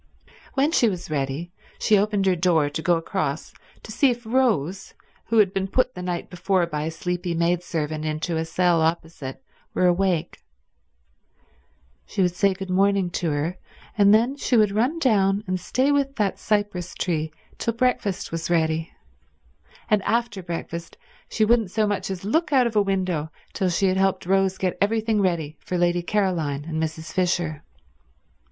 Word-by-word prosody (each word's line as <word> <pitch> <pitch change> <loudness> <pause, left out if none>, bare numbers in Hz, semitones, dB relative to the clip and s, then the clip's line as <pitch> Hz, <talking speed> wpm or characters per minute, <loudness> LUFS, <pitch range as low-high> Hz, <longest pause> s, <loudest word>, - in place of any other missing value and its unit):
When 280 +3 +2
she 240 -9 +4
was 180 -4 -6
ready 145 +4 -2 0.3
she 215 - +3
opened 205 -1 +1
her 190 -1 +3
door 165 -4 +2
to 160 - -3
go 175 0 +3
across 165 -3 -3 0.3
to - - -9
see 275 +5 +3
if 240 -1 -3
Rose, 210 - 0 0.3
who 230 - +1
had 200 -3 +4
been 195 0 -1
put 255 +5 +1
the 180 - -7
night 180 -1 -3
before 180 0 0
by 150 -2 -3
a - - -1
sleepy 175 +1 -3
maidservant 165 -3 -1
into 155 +2 -2
a 160 - 0
cell 170 +1 +2
opposite, 160 -4 -2 0.3
were 185 - +2
awake. 175 -2 +1 1.7
She 195 - 0
would 180 -1 +1
say 195 0 +2
good 190 -1 -6
morning 195 -1 +2
to 175 -2 -1
her, 150 +5 -2 0.4
and 200 -1 +5
then 235 +6 +3
she 255 -3 +1
would 210 -2 +4
run 245 +10 +1
down 205 -8 +2
and 185 -1 -2
stay 260 +10 +1
with 280 -1 +1
that 205 -5 -1
cypress 205 -4 -1
tree 160 -3 -1 0.3
till 230 - -1
breakfast 235 -6 0
was 165 0 -3
ready, 160 -1 +1 1.0
and 210 -1 +3
after 225 -1 -1
breakfast 170 -1 -6 0.3
she 215 - +2
wouldn't 225 -3 +3
so 215 +3 +1
much 200 -2 -2
as 190 -1 -5
look 310 +9 +1
out 260 -3 +5
of 230 -2 -2
a 210 - +5
window 185 -6 -1 0.2
till 190 - 0
she 180 +3 +1
had 190 0 +2
helped 195 -2 +1
Rose 190 0 +2
get 185 -2 -2
everything 220 +1 +1
ready 165 -5 -1
for 180 - -3
Lady 175 0 +2
Caroline 170 -8 -1
and 160 -1 -3
Mrs. 160 0 -4
Fisher. 175 -4 0
185 Hz, 175 wpm, -24 LUFS, 165-210 Hz, 1.7 s, and